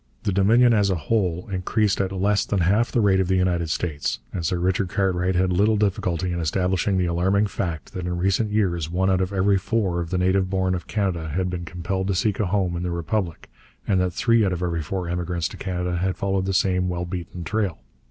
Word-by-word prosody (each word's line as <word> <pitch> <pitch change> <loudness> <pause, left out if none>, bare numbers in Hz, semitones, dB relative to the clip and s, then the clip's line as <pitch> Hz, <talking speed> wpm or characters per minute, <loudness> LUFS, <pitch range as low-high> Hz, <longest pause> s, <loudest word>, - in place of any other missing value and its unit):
The 100 - 0
Dominion 115 +6 +4
as 100 -3 +3
a 95 - +1
whole 90 +1 -1
increased 100 +2 +1
at 95 -1 -1
less 100 +1 +1
than 100 - -1
half 105 +7 +2
the 120 - +2
rate 95 -2 +4
of 95 - +1
the 95 - +2
United 90 -3 +1
States, 75 -3 -2 0.2
and 90 - -3
Sir 90 +2 0
Richard 95 +1 0
Cartwright 95 -1 0
had 90 0 +2
little 105 +4 +3
difficulty 90 -3 0
in 85 - -2
establishing 90 +3 0
the 90 - +2
alarming 95 +4 +2
fact 85 -5 -4
that 90 -2 -4
in 90 0 -2
recent 95 +4 +1
years 85 -7 0
one 95 +2 +1
out 95 0 +2
of 95 +1 -1
every 100 0 +2
four 95 -3 0
of 85 - -5
the 90 - -1
native 95 +1 +2
born 95 -1 0
of 90 - -4
Canada 95 -6 -1
had 90 +4 -1
been 85 -1 -4
compelled 90 +3 -3
to 100 - 0
seek 105 +1 0
a 105 - +1
home 90 -2 0
in 85 - -3
the 90 - -2
Republic, 85 +1 -3 0.4
and 95 -3 +2
that 90 -1 0
three 115 +1 +3
out 95 -3 +1
of 90 0 -3
every 85 -2 -1
four 90 +3 -4
immigrants 85 -1 -2
to - - -9
Canada 90 -1 -2
had 95 0 -1
followed 95 -1 0
the - - 0
same 90 -1 +2
well 90 0 -2
beaten 90 -1 -6
trail. 100 -2 -1
95 Hz, 230 wpm, -23 LUFS, 90-100 Hz, 0.4 s, Dominion